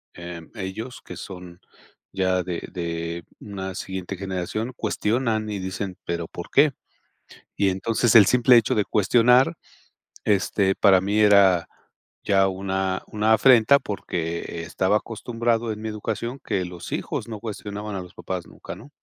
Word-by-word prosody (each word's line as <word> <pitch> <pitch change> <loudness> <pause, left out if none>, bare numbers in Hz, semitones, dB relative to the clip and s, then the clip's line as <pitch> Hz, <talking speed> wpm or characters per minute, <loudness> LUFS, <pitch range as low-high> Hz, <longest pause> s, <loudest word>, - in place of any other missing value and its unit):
eh, 85 -1 -7
ellos, 110 +5 -6
que 90 - -8
son 90 -1 -9 0.5
ya 95 -1 +1
de 90 -1 -5
de 85 -1 -4 0.2
una 95 -2 -6
siguiente 95 0 -5
generación, 100 +5 -3
cuestionan 110 0 0
y 100 - -3
dicen: 95 0 -4
"Pero, 85 -1 -3
¿por 85 - -8
qué?". 145 +1 +5 0.8
Y 100 -1 +2
entonces, 110 +5 +1
el 105 -3 +10
simple 125 +3 +5
hecho 115 - +2
de 105 - +2
cuestionar, 120 +5 +4 0.7
este, 100 -1 +2
para 95 -2 +5
mí 100 +3 0
era 100 -4 +5 0.6
ya 95 -1 +3
una 95 0 -2
una 110 +1 +2
afrenta, 125 +2 +6
porque 85 -6 -4
estaba 95 +4 +1
acostumbrado 115 +1 -2
en 105 - -9
mi 110 - -3
educación 110 +4 -4
que 95 -2 -1
los 90 -1 -9
hijos - - -3
no 110 -2 -6
cuestionaban 105 -1 -6
a 95 - -3
los 90 -1 -12
papás 90 -2 -5
nunca, - - -9
¿no? - - -13
100 Hz, 150 wpm, -24 LUFS, 95-110 Hz, 0.8 s, el